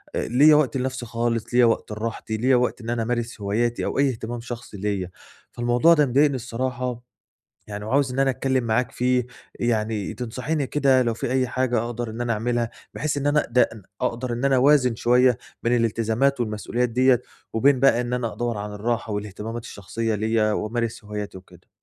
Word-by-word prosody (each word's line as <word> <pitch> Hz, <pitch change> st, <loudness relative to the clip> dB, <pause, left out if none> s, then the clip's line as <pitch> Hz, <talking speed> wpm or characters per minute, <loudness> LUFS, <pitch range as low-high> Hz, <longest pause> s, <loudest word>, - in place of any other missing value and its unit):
ليّا 145 Hz, +6 st, +5 dB
وقت 140 Hz, -4 st, +2 dB
لنَفسي 130 Hz, -1 st, -3 dB
خالص، 115 Hz, 0 st, -2 dB
ليّا 125 Hz, 0 st, +6 dB
وقت 115 Hz, -1 st, 0 dB
لراحتي، 110 Hz, 0 st, -4 dB
ليّا 130 Hz, +4 st, +3 dB
وقت 125 Hz, 0 st, 0 dB
إن 115 Hz, -, -6 dB
أنا 120 Hz, -1 st, 0 dB
أمارس 120 Hz, -1 st, -3 dB
هواياتي 115 Hz, +4 st, 0 dB
أو -, -, -2 dB
أيّ 140 Hz, 0 st, +4 dB
اهتمام 120 Hz, -1 st, -5 dB
شخصي 115 Hz, -3 st, -8 dB
ليّا. 100 Hz, -2 st, -2 dB, 0.4 s
فالموضوع 120 Hz, +7 st, +3 dB
ده 150 Hz, -3 st, +4 dB
مضايقني 140 Hz, +2 st, +3 dB
الصراحة 125 Hz, 0 st, -3 dB, 0.7 s
يعني 105 Hz, 0 st, -6 dB
وعاوز 130 Hz, +3 st, +1 dB
إن 130 Hz, -, -5 dB
أنا 135 Hz, 0 st, +3 dB
أتكلم 130 Hz, -1 st, 0 dB
معاك 115 Hz, +2 st, +1 dB
في 125 Hz, 0 st, +1 dB, 0.3 s
يعني 110 Hz, -3 st, -1 dB
تنصحيني 125 Hz, +5 st, -3 dB
كده 135 Hz, -2 st, +3 dB
لو 120 Hz, -2 st, 0 dB
في 120 Hz, -, -3 dB
أيّ 130 Hz, -1 st, +2 dB
حاجة 125 Hz, 0 st, 0 dB
أقدر 120 Hz, -1 st, -4 dB
إن 110 Hz, +2 st, -7 dB
أنا 120 Hz, -1 st, 0 dB
أعملها، 120 Hz, +1 st, -1 dB, 0.2 s
بحيث 150 Hz, -1 st, -2 dB
إن 140 Hz, 0 st, -2 dB
أنا 150 Hz, +1 st, +2 dB
د 125 Hz, +1 st, +4 dB, 0.3 s
أقدر 120 Hz, +1 st, -2 dB
إن 120 Hz, +3 st, -3 dB
أنا 135 Hz, -1 st, +4 dB
أوازن 130 Hz, -2 st, +4 dB
شوية 125 Hz, +1 st, +3 dB, 0.2 s
بين 120 Hz, +1 st, +2 dB
الالتزامات 115 Hz, +4 st, +1 dB
والمسؤوليات 120 Hz, +2 st, -1 dB
ديّة، 125 Hz, +1 st, +3 dB, 0.3 s
وبين 130 Hz, +3 st, +3 dB
بقى 135 Hz, -3 st, +4 dB
إن 120 Hz, 0 st, -3 dB
أنا 120 Hz, -3 st, -1 dB
أدوّر 120 Hz, -3 st, -2 dB
على 105 Hz, 0 st, -5 dB
الراحة 110 Hz, +1 st, -2 dB
والاهتمامات 105 Hz, +3 st, -5 dB
الشخصية 110 Hz, +2 st, -3 dB
ليّا 110 Hz, 0 st, +1 dB
وأمارس 115 Hz, +1 st, -2 dB
هواياتي 105 Hz, -2 st, -6 dB
وكده. 95 Hz, -, -19 dB
120 Hz, 180 wpm, -24 LUFS, 110-130 Hz, 0.7 s, ليّا